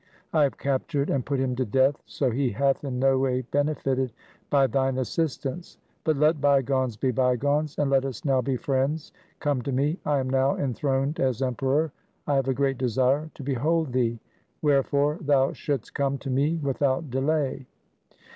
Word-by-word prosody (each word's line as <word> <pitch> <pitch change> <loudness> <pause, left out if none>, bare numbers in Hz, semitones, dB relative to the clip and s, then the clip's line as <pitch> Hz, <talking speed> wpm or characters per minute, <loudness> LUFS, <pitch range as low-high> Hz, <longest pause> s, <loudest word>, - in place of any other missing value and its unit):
I 155 - +4
have 140 -2 +2
captured 140 +1 -1
and 135 -3 0
put 140 +1 -2
him 130 -1 0
to 130 - +1
death, 130 +5 +2
so 125 - -1
he 130 +2 0
hath 135 +6 +1
in 130 -3 -3
no 135 +1 +3
way 130 -1 +1
benefited 135 -2 0 0.4
by 140 -2 +4
thine 135 +1 0
assistance. 155 +4 -3 0.3
But 155 -3 +1
let 150 0 +3
bygones 135 -4 +2
be 130 +3 +1
bygones, 140 +5 +1
and 145 -2 +1
let 135 -1 +4
us 135 -2 -6
now 135 -2 +3
be 130 0 -1
friends. 140 +5 -1 0.3
Come 145 -4 0
to 140 - -3
me. 145 +7 0
I 145 -1 +1
am 130 -1 -1
now 135 +1 +2
enthroned 135 +2 -1
as 130 -1 +1
Emperor. 135 +4 0 0.3
I 145 - 0
have 135 -1 +1
a 135 - +2
great 135 -1 0
desire 130 +5 +1
to 140 - -9
behold 145 +2 0
thee. 120 -2 0 0.4
Wherefore 145 +1 +2
thou 140 -3 +2
shouldst 140 -6 -3
come 140 0 0
to 135 0 -5
me 145 +5 +2
without 135 +1 0
delay.' 135 0 -1
135 Hz, 175 wpm, -26 LUFS, 130-145 Hz, 0.4 s, I